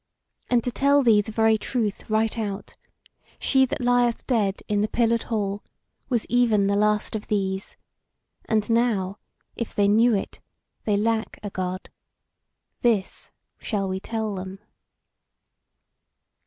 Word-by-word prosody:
And 240 -2 +3
to 245 - -2
tell 280 +3 +3
thee 220 -4 +5
the 220 - -8
very 220 0 +3
truth 220 -5 -2
right 220 0 +1
out, 205 -2 -4 0.6
she 265 -1 +3
that - - -4
lieth 245 -1 +2
dead 205 -6 0
in 205 -1 +1
the 210 - +1
Pillared 230 +1 +1
Hall 205 -3 -2 0.5
was 240 -4 0
even 230 -5 +3
the 200 0 +1
last 210 +1 +1
of 210 - -5
these; 195 -1 -2 0.7
and 215 -2 +1
now, 220 -5 +1 0.4
if 235 - -5
they 200 -1 +3
knew 225 +3 +4
it, 195 - -4 0.5
they 210 -2 +2
lack 225 +1 -1
a 205 - -5
God. 185 0 -4 0.9
This 220 -6 0 0.3
shall 200 -4 -2
we 190 0 -2
tell 220 +1 -3
them." 190 0 -6
215 Hz, 140 wpm, -24 LUFS, 200-235 Hz, 0.9 s, thee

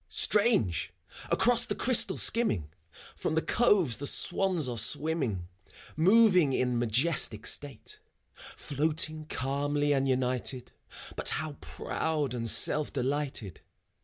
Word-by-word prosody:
Strange! 205 - +1 0.4
across 240 0 +2
the - - -3
crystal 255 -2 +1
skimming, 105 - +1 0.4
From 155 - -3
the 160 - +1
coves 195 - +1
the 145 - -2
swans 175 -4 +1
are 120 - -4
swimming, 115 - +1 0.5
Moving 185 -3 +4
in 125 -2 -1
majestic 120 -2 +1
state: 145 - -3 0.3
Floating 155 +1 -4
calmly 145 +2 -1
and 135 -1 0
united, 130 0 -2 0.4
But - - +2
how 155 -1 -5
proud 150 -5 -3
and 115 -2 -1
self 150 +7 +3
delighted. 135 - -4
145 Hz, 110 wpm, -28 LUFS, 125-165 Hz, 0.5 s, Moving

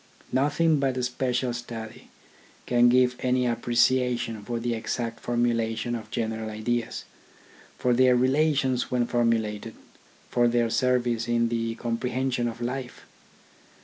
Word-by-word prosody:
Nothing 150 +3 +2
but 135 -2 0
a 125 - -1
special 125 0 -1
study 115 -2 -8 0.6
can 120 0 +4
give 125 0 +4
any 125 0 +1
appre 120 0 -2
ciation 120 -3 +2
for 120 +1 -3
the 120 0 -1
exact 115 +1 -3
formulation 120 -1 0
of 110 -3 -5
general 110 -1 -3
ideas, 110 +2 -2 0.7
for 125 - +1
their 125 +1 +5
relations 130 0 +2
when 125 -1 +1
formulated, 115 -2 0 0.6
for 120 0 +3
their 120 -1 +1
service 120 -1 +1
in 115 0 +1
the 115 -1 -2
comprehension 125 +1 -1
of 115 +1 -6
life. 125 +1 -5
120 Hz, 130 wpm, -26 LUFS, 115-125 Hz, 0.7 s, their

